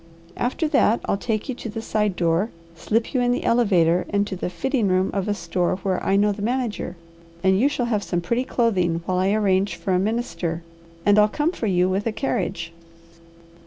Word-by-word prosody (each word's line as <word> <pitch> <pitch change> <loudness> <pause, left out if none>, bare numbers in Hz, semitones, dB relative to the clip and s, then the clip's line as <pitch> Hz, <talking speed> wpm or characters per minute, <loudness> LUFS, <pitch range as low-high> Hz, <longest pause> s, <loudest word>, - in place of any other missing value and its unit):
After 260 +6 -1
that 240 -6 +3
I'll - - +1
take 215 +1 -2
you 260 - -2
to 235 - -7
the 220 +1 -5
side 210 -3 0
door, 170 +5 +1 0.3
slip 225 +7 -1
you 255 - +2
in 245 0 +2
the 245 - -1
elevator 180 -7 +3
and 200 0 +1
to 200 - -5
the 180 - -3
fitting 220 - 0
room 185 0 +2
of 195 -1 -1
a 205 - 0
store 175 -1 -1
where 190 0 -2
I 195 - +2
know 205 +1 +3
the 200 0 -6
manager, 240 -2 -2 0.5
and 190 0 +4
you 270 +5 +4
shall 260 -4 -1
have 220 -4 0
some 175 -3 -2
pretty 235 +9 0
clothing 185 -10 0
while 185 -1 0
I 190 +2 +2
arrange 200 -2 +1
for 190 - -2
a 180 - +3
minister, 190 -6 -2 0.4
and 205 +1 +5
I'll 210 - +6
come 300 +8 0
for 235 -11 -3
you 180 -2 +3
with 195 +4 -1
a - - +1
carriage. 195 -8 -2
205 Hz, 210 wpm, -23 LUFS, 185-230 Hz, 0.5 s, I'll